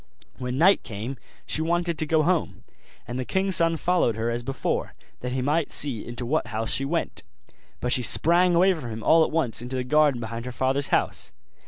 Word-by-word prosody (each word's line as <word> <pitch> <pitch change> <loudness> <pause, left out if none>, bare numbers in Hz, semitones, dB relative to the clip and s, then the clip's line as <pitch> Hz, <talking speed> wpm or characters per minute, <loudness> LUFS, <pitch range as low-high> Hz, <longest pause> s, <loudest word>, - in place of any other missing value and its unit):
When 125 0 -3
night 185 +6 +5
came 115 +4 -6 0.3
she 155 - -1
wanted 170 0 -1
to 155 - -1
go 155 0 +3
home; 175 -1 -1 0.4
and 120 +1 -4
the - - -1
king's 190 +6 +2
son 165 -1 +3
followed 175 - +1
here 115 +1 -2
as 120 +1 -2
before, 135 +1 -3 0.2
that 125 0 -4
he 130 -1 -1
might 150 +3 0
see 130 -7 +1
into 120 +1 -6
what 150 +2 0
house 110 -1 -2
she 135 - -1
went: 165 +4 -2 0.6
but 125 - 0
she 125 - +2
sprang 170 +8 +3
away 185 +3 +5
from 145 -9 -7
him 110 0 -6
all 165 0 +5
at - - -1
once 140 -8 -1
into 125 +2 -5
the 130 - -1
garden 150 -1 +3
behind 115 +1 -6
her 125 - -5
father's 130 +3 0
house. - - -1
135 Hz, 210 wpm, -25 LUFS, 120-165 Hz, 0.6 s, night